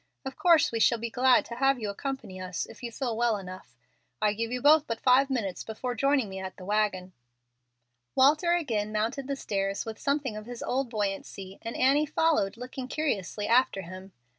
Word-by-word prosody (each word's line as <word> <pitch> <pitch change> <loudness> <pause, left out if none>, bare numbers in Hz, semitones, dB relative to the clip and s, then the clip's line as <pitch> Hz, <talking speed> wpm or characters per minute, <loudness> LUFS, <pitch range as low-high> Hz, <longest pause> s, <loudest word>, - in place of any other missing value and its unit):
Of 265 - -5
course 340 -3 +4
we 230 - -2
shall 235 - +4
be 230 0 -5
glad 255 +1 +4
to 235 - -7
have 270 0 +3
you 215 - -3
accompany 225 -5 -5
us 180 -2 -3
if - - -14
you 240 -1 -5
feel 240 -1 -3
well 235 -1 +1
enough. 185 -9 -10 0.4
I 210 -1 +2
give 230 +2 -3
you 250 - -2
both 300 +3 +5
but 230 0 -3
five 260 +3 +4
minutes 205 -9 -2
before 245 +3 -4
joining 275 0 +2
me 190 -1 -7
at 190 0 -7
the 185 - -10
wagon." 200 -3 0 1.0
Walter 300 +6 +4
again 225 -12 -1
mounted 225 +6 -2
the 280 - -1
stairs 195 -5 -2
with 220 -1 -7
something 280 -5 -1
of 215 +1 -8
his 245 -1 -7
old 260 0 -1
buoyancy, 195 -3 -4
and 230 0 -6
Annie 280 +4 +3
followed, 300 -11 +1
looking 250 +1 -6
curiously 215 - -2
after 235 -5 +3
him. 185 +2 -10
230 Hz, 195 wpm, -28 LUFS, 200-270 Hz, 1.0 s, both